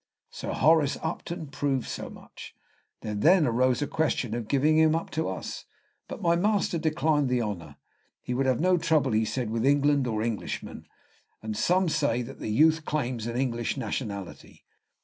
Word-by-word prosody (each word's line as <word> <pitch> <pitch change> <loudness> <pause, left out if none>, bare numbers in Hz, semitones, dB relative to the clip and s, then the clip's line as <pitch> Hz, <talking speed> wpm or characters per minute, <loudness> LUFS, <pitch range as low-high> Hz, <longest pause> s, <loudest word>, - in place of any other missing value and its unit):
Sir - - -5
Horace 155 -1 +3
Upton 165 0 -4
proved 140 -3 -2
so - - -5
much. - - -12 0.5
There 105 - -4
then 160 - +4
arose 125 +3 +2
a - - -2
question 145 -7 -1
of 120 -2 -4
giving 150 +4 +3
him 160 0 +4
up 165 - -3
to 160 - -1
us; 95 - -6 0.4
but - - -8
my 170 0 +3
master 195 -2 +1
declined 155 -3 +1
the 125 -1 +1
honor, 85 -9 -5 0.4
he 125 - -4
would 135 +2 0
have 130 -2 +2
no 180 +2 +3
trouble, 150 -5 +2
he 110 +1 +2
said, 120 0 -3
with 115 0 -1
England 145 0 +3
or 110 -2 -1
Englishmen; 115 -2 -5 0.6
and 110 -1 -4
some 180 - +2
say 140 -6 +1
that 135 +3 -10
the - - -4
youth 155 +8 +4
claims 125 -7 -2
an 120 +1 -3
English 120 -1 -1
nationality. 100 -8 -6
135 Hz, 175 wpm, -27 LUFS, 115-160 Hz, 0.6 s, then